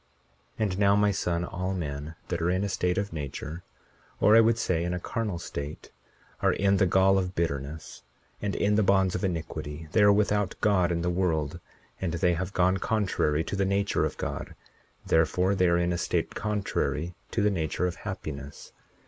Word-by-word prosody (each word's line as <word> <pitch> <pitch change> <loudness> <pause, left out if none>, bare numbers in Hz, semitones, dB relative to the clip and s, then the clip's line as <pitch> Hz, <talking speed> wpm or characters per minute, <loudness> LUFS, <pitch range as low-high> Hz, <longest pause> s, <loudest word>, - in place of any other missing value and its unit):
41:11 110 - +1
And 95 -1 -2
now, 100 0 +5
my 105 0 +3
son, 85 -2 -1
all 90 +2 -3
men 75 -2 -5
that 85 -2 -2
are 85 - +1
in 95 +2 +1
a 100 - -1
state 90 -1 0
of 100 -3 -2
nature, 75 +2 -5 0.6
or 105 - +6
I 115 - +9
would 115 0 +3
say, 85 -7 0
in 90 +1 -1
a - - -3
carnal 105 -1 -3
state, 75 -3 -7 0.5
are - - +3
in 100 0 +2
the 95 - +3
gall 95 +2 +4
of 90 0 -3
bitterness 75 -1 -3 0.4
and 105 -2 -2
in 105 +1 +2
the - - +4
bonds 95 -2 +3
of 90 - -3
iniquity; 80 -3 -4
they 110 - +3
are 105 0 +7
without 105 -1 +1
God 95 -4 +3
in 85 -1 -1
the 90 - +1
world, 85 -3 0 0.4
and 90 -3 -1
they 85 +1 +2
have 90 +2 -3
gone 95 0 +2
contrary 90 -7 0
to 100 - -4
the 100 - +1
nature 100 +1 +1
of - - -2
God; - - -5 0.5
therefore, 90 +4 +2
they 95 -2 +3
are 85 0 +3
in 85 0 +1
a 85 - -2
state - - -1
contrary 100 -5 -2 0.2
to 110 - 0
the 105 - +3
nature 80 -1 -1
of 90 -1 -2
happiness. 75 -8 -7
90 Hz, 200 wpm, -27 LUFS, 85-100 Hz, 0.6 s, I